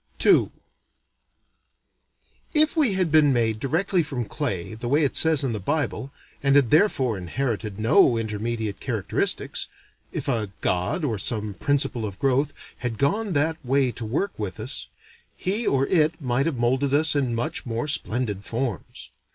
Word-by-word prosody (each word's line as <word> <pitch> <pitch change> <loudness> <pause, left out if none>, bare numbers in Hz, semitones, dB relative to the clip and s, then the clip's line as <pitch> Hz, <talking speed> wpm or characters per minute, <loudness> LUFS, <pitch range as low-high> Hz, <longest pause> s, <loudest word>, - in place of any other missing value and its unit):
II - - +5 2.1
If 310 +2 +4
we 285 -10 +3
had 185 -4 0
been 155 -2 +5
made 115 -3 +1
directly 175 - +1
from 135 -6 -3
clay, 95 -2 -3
the 115 +2 -5
way 145 +5 +3
it 140 - 0
says 160 -3 +5
in 130 -4 -1
the 105 - -3
Bible, 145 +3 -2 0.3
and 140 0 +3
had 140 -5 +4
therefore 135 - +3
inherited 105 +1 -3
no 120 - +4
intermediate 110 -1 -3
characteristics, - - -1 0.4
if - - -4
a 115 -6 0
god, 95 - 0
or 110 -7 -1
some 105 0 -2
principle 135 0 0
of 100 -3 -5
growth, 135 +2 +1 0.3
had 120 -3 -3
gone 200 - 0
that 160 +2 0
way 135 0 +2
to 120 - -7
work 150 - -1
with 105 0 -4
us, 125 +5 -6 0.5
he 205 +6 -1
or 135 0 +2
it 160 0 +2
might 130 0 0
have 155 -6 -2
molded 130 +4 +1
us 155 0 +3
in 130 -5 0
much 120 +2 -3
more 115 +4 -2
splendid 115 -7 -1
forms. 115 -1 -5
130 Hz, 160 wpm, -24 LUFS, 110-150 Hz, 2.1 s, II